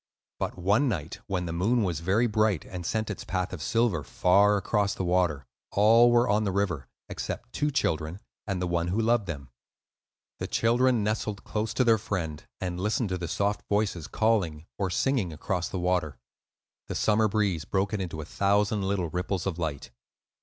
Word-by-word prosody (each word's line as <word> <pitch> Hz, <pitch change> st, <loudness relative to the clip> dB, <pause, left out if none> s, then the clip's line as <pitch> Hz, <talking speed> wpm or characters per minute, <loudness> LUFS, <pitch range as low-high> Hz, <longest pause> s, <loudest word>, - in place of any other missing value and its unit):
But -, -, -3 dB
one 100 Hz, +10 st, +2 dB
night, 80 Hz, -7 st, -4 dB
when 90 Hz, -2 st, -1 dB
the 85 Hz, -, -4 dB
moon 110 Hz, +7 st, +2 dB
was 85 Hz, -5 st, -1 dB
very 95 Hz, +8 st, +2 dB
bright 110 Hz, -5 st, +1 dB
and 90 Hz, -3 st, -6 dB
sent 110 Hz, -1 st, -1 dB
its 105 Hz, -, -6 dB
path 90 Hz, -1 st, -2 dB
of 90 Hz, -, -6 dB
silver 115 Hz, -5 st, +1 dB
far 100 Hz, +6 st, +4 dB
across 100 Hz, 0 st, 0 dB
the -, -, -3 dB
water, 90 Hz, -6 st, +1 dB, 0.3 s
all 115 Hz, +4 st, +6 dB
were 120 Hz, +1 st, +4 dB
on 105 Hz, -1 st, +2 dB
the 100 Hz, -, 0 dB
river, 90 Hz, -9 st, -1 dB, 0.2 s
except -, -, -5 dB
two 150 Hz, -, 0 dB
children 80 Hz, -, -1 dB, 0.3 s
and 95 Hz, -3 st, -1 dB
one 85 Hz, -1 st, 0 dB
who 95 Hz, +5 st, 0 dB
loved 115 Hz, -2 st, +2 dB
them. 70 Hz, -5 st, -6 dB, 0.9 s
The -, -, -3 dB
children 120 Hz, 0 st, +2 dB
nestled 105 Hz, -1 st, -2 dB
close 110 Hz, 0 st, -2 dB
to 130 Hz, -, +3 dB
their 115 Hz, -3 st, +4 dB
friend, 85 Hz, -8 st, -3 dB, 0.2 s
and 90 Hz, -1 st, -3 dB
listened 105 Hz, +2 st, 0 dB
to 90 Hz, -, -1 dB
the 85 Hz, -, -3 dB
soft 100 Hz, +5 st, 0 dB
voices 100 Hz, -6 st, 0 dB
calling 90 Hz, -9 st, 0 dB
or 95 Hz, -2 st, 0 dB
singing 115 Hz, -2 st, 0 dB
across 85 Hz, +3 st, -2 dB
the -, -, -4 dB
water. 90 Hz, -4 st, 0 dB, 0.7 s
The -, -, -4 dB
summer 110 Hz, 0 st, +3 dB
breeze 100 Hz, -6 st, 0 dB
broke 95 Hz, +5 st, -1 dB
it 105 Hz, -, -1 dB
into 80 Hz, -4 st, -4 dB
a -, -, -7 dB
thousand 100 Hz, +4 st, +1 dB
little 95 Hz, -4 st, -1 dB
ripples 90 Hz, +1 st, -2 dB
of 90 Hz, -3 st, -2 dB
light. 75 Hz, -6 st, -4 dB
100 Hz, 185 wpm, -28 LUFS, 85-110 Hz, 0.9 s, all